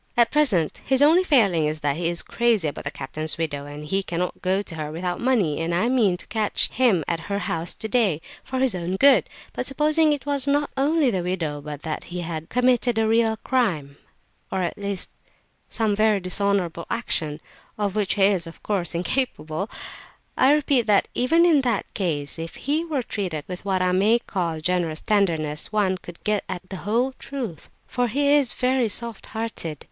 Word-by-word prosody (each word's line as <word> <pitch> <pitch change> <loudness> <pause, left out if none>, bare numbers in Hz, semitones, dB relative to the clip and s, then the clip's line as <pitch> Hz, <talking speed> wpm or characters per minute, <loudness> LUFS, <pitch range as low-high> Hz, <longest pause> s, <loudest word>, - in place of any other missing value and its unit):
At 235 -1 +4
present 230 - +2
his 265 +1 +4
only 330 +5 +6
failing 200 - +3
is 155 0 -3
that 145 -1 0
he 170 +1 0
is 170 0 0
crazy 230 -8 +1
about - - -8
that - - -4
captain's 155 +4 -3
widow, 145 -3 -3
and 145 +1 -8
he 195 +6 +1
cannot 180 -1 -3
go 190 +2 +1
to 180 - -7
her 155 -2 -5
without 175 +2 -3
money, 225 - +1
and 170 +1 -1
I 220 +7 +2
mean 220 -8 +2
to - - -15
catch 215 -2 +1
him 225 -10 +2
at 170 - -1
her 200 - 0
house 165 -4 -2
today—for 220 - -2
his 260 -3 +2
own 180 0 -3
good; 275 +8 +5 0.2
but - - -3
supposing 305 +3 +3
it 290 -2 -2
was 285 -2 -1
not 290 +1 +1
only 285 0 +2
the 185 -4 -1
widow, 170 -5 -3
but 150 0 -8
that 155 -2 -4
he 175 0 -5
had 165 -1 -5
committed 245 -1 +2
a 220 0 +2
real 225 0 +2
crime, 175 - 0 0.6
or 190 - 0
at 175 - -2
least 200 -2 -3 0.6
some 220 -3 0
very 215 -1 +3
dishonourable 185 -2 -1
action 155 -10 -2 0.4
(of 205 -2 -1
which 200 -2 0
he 200 - +2
is, 190 -4 +3
of 165 - -12
course, 180 -5 -2
incapable), 180 - -1 0.7
I 265 - +5
repeat 285 -5 +3
that 205 -2 +3
even 325 +8 +3
in 315 -5 +5
that 240 -6 -1
case, 155 -5 -2
if 165 0 -6
he 300 +4 -1
were 300 -6 -2
treated 180 -10 -3
with 180 -1 -7
what 190 -2 +1
I 180 - +2
may 205 +5 +4
call 170 -8 -3
generous 170 -2 0
tenderness, 165 -8 0
one 195 -3 +1
could 175 -2 -12
get 210 -2 0
at 185 +1 -5
the 190 - -4
whole 235 +7 0
truth, 245 - -6 0.2
for 245 -1 -1
he 280 +5 +1
is 285 -4 +3
very 255 -2 +1
soft 235 0 -3
hearted! 220 -9 -5
200 Hz, 195 wpm, -24 LUFS, 170-245 Hz, 0.7 s, only